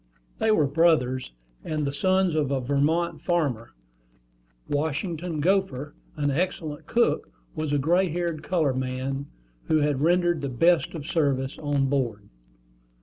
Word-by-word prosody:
They - - +2
were 185 -9 +4
brothers, 140 - +2 0.3
and 155 -1 -2
the 140 - -2
sons 185 +3 +2
of 150 -3 +1
a 140 -1 0
Vermont 145 +6 0
farmer. 145 -10 0 1.0
Washington 160 +2 -2
Gopher, 150 -6 0 0.2
an 145 -1 0
excellent 155 -1 -2
cook, 235 - +1 0.2
was 155 -2 -3
a 145 - +2
gray 175 +6 +2
haired 170 -1 -2
colored 150 -5 0
man, 130 +2 -3 0.4
who 160 - +2
had 145 -2 +1
rendered 175 +1 +2
the 140 - -2
best 165 +7 +2
of 150 -3 -6
service 140 -5 0
on 145 -2 0
board. 120 -7 -1
150 Hz, 140 wpm, -26 LUFS, 135-170 Hz, 1.0 s, were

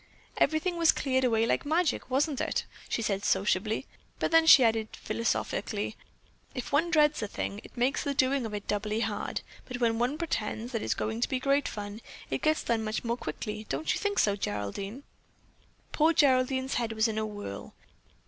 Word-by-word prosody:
"Everything 330 +3 +1
was 335 -1 +6
cleared 260 -1 0
away 225 -2 +3
like - - +1
magic, 315 -2 0
wasn't 275 +2 +1
it?" - - -1 0.2
she 230 - -1
said 200 -2 -1
sociably; 205 +5 +1 0.3
then 325 0 +3
she 270 - +10
added 225 -1 +2
philosophically: 230 - -2 0.6
"If 250 - -5
one 315 +4 +2
dreads 300 -4 +3
a 210 - -2
thing, 200 0 -4
that - - -16
makes 250 +4 +1
the 280 -1 -2
doing 260 -2 +2
of 215 - -8
it 205 - -6
doubly 210 +2 -1
hard, 210 -2 -2 0.3
but 250 -1 -5
when 230 -2 +2
one 250 +5 0
pretends 240 -7 -3
that 230 -3 -2
it - - -4
is - - 0
going 220 +2 -3
to - - +1
be 260 - 0
great 275 +2 +2
fun, 205 +1 -6 0.3
it - - -1
gets 310 0 +2
done 225 -1 0
much 215 0 -2
more 235 0 0
quickly; 215 -3 -5
don't 150 +3 0
you - - -2
think 405 -1 -1
so, 205 -1 +3
Geraldine?" 195 - -4 0.9
Poor 320 +2 +3
Geraldine's 260 -2 +3
head 225 -1 -2
was 220 +1 +2
in 220 -1 -2
a 220 - -1
whirl. 205 - -7
235 Hz, 190 wpm, -29 LUFS, 215-280 Hz, 0.9 s, she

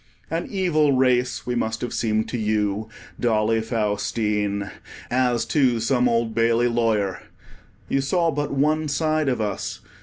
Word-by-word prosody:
An 165 +1 -2
evil 160 -7 +2
race 125 -1 +1
we 125 - -2
must 110 -2 -2
have 120 - -3
seemed 110 -1 0
to 125 - -3
you, 105 0 -1 0.3
Dolly 110 -1 +2
Faustine, 105 -2 -1 0.4
as 125 -2 +1
to 130 -6 +2
some 125 +2 +2
Old 115 -1 0
Bailey 115 +1 +3
lawyer. 110 -5 0 0.7
You 135 - +1
saw 165 +4 +1
but 145 0 -2
one 155 +3 +1
side 155 0 +1
of 125 - -1
us. 105 -2 -3
120 Hz, 145 wpm, -23 LUFS, 110-135 Hz, 0.7 s, Bailey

